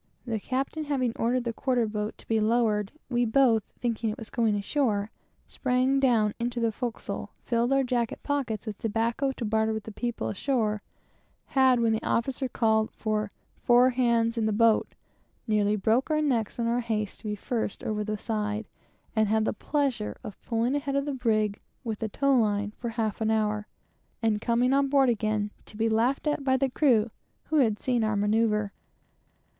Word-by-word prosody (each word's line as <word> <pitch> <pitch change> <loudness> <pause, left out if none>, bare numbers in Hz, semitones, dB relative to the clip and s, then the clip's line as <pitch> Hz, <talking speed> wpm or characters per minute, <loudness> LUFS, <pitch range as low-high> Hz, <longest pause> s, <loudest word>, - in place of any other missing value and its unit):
The 225 -3 -2
captain 270 +7 -2
having 260 -5 0
ordered 245 +2 0
the 235 -1 -2
quarter 250 -2 +1
boat 210 0 -3
to - - -16
be 225 -1 +2
lowered, 215 -2 +1 0.2
we 245 -1 +1
both 235 -1 +4 1.8
sprang 260 +1 +1
down 230 -6 +3
into 240 +1 -2
the 230 -1 +1
forecastle, 240 +1 -4
filled 235 +1 +1
our 275 0 +4
jacket 240 -3 -1
pockets 265 -8 -2
with 215 -2 -6
tobacco 230 +5 0
to 240 - -5
barter 220 +1 +1
with 220 -1 -4
the 220 - -8
people 240 +2 -3
ashore, 215 -2 0 0.7
and 260 -3 +5
when 225 -1 +3
the 220 - -1
officer 260 +2 -1
called 220 -2 +2
for 215 -2 -2 0.3
"four 250 +1 +5
hands 235 -2 +1
in 220 - +1
the - - +1
boat," 225 +1 +3 0.5
nearly 210 -2 +2
broke 225 +7 +1
our 305 -1 +2
necks 245 -8 0
in 235 - -1
our 235 +1 +1
haste 215 -4 -2
to - - -13
be 210 - -1
first 225 0 -3
over 210 -1 -1
the 215 0 -3
side, 210 0 -2 0.5
and 220 -1 +3
had 220 +1 +2
the - - 0
pleasure 270 -3 -1
of 210 - -9
pulling 235 +2 0
ahead 280 -1 -1
of 280 0 +1
the 290 - -2
brig 215 -5 0 0.2
with 225 -4 -4
a 220 - -1
tow 275 +5 +2
line 205 -3 +1
for 240 - -6
a - - -2
half 225 -2 -2
an 220 - +1
hour, 215 -1 0 0.5
and 215 -2 +1
coming 245 +2 +2
on 275 0 +3
board 270 -2 +4
again 215 -2 0 0.2
to 210 - -12
be 225 +1 +2
laughed 230 +6 +1
at 295 -1 0
by 260 -1 +3
the 270 -1 0
crew, 240 -6 +3 0.4
who 310 - +2
had 225 -7 +3
seen 245 -1 0
our 215 -1 +1
manoeuvre. 210 0 +1
230 Hz, 180 wpm, -27 LUFS, 215-255 Hz, 1.8 s, and